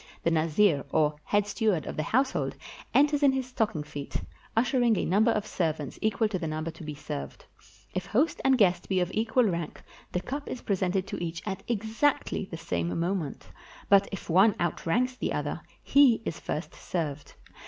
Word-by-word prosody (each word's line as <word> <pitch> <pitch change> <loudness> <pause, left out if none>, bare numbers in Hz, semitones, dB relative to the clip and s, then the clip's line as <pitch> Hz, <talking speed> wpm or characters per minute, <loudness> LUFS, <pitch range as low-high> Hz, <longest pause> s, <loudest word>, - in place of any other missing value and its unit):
The 170 - +2
nazir, 160 0 +3
or 150 -1 +2
head 205 -1 +2
steward 205 -5 0
of - - -5
the - - -1
household, 260 - 0 0.4
enters 290 +1 +4
in 280 -2 +5
his 265 -1 -1
stocking 220 -10 -1
feet, 145 -1 -8 0.4
ushering 240 -2 +3
a - - 0
number 210 +6 +3
of 215 -2 +1
servants 155 -5 -2
equal 220 +1 +2
to 190 -3 -2
the 165 - -3
number 155 +1 -3
to 160 +1 -12
be 150 -1 -5
served. 70 - -6 0.5
If 185 0 -3
host 270 +11 +1
and 265 -1 +4
guest 180 -5 +2
be 190 -1 +2
of 180 0 0
equal 225 +3 +2
rank, 170 -7 -2 0.3
the 180 - 0
cup 280 +9 -5
is 250 - -6
presented 190 -1 0
to 185 - -5
each 170 0 -4
at 195 -2 -3
exactly 225 +1 0
the 165 - -7
same 85 - -2
moment; 170 -4 -2 0.4
but 200 0 +6
if 195 - -6
one 190 +5 +5
outranks 210 +9 0
the - - -2
other, - - -2 0.2
he 265 -5 +5
is 165 - -3
first 155 +3 -4
served. 150 -5 -4
190 Hz, 185 wpm, -28 LUFS, 165-225 Hz, 0.5 s, but